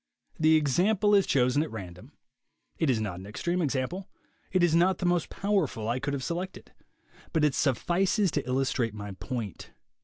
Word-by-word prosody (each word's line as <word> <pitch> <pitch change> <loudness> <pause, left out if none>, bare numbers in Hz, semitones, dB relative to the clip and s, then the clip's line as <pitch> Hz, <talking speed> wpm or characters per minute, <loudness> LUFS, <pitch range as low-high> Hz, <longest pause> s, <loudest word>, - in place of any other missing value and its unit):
The 160 0 +5
example 185 +8 +2
is 200 -2 +5
chosen 130 +2 +3
at 155 - -2
random. 90 -5 -9 0.7
It 160 - +2
is 120 -4 +2
not 100 -5 -3
an 95 - -10
extreme 175 +12 -2
example. 155 +6 -2 0.4
It 185 -1 +2
is 170 -2 +3
not 180 +3 +4
the 180 - -3
most 175 -2 +1
powerful 190 - -1
I 120 +3 0
could 145 +2 -2
have 135 - -4
selected. 180 +5 -5 0.6
But 160 -2 +3
it 150 - +2
suffices 180 - +1
to 145 -4 -2
illustrate 125 -3 0
my 105 -1 -6
point. 110 - -6
150 Hz, 175 wpm, -28 LUFS, 125-180 Hz, 0.7 s, The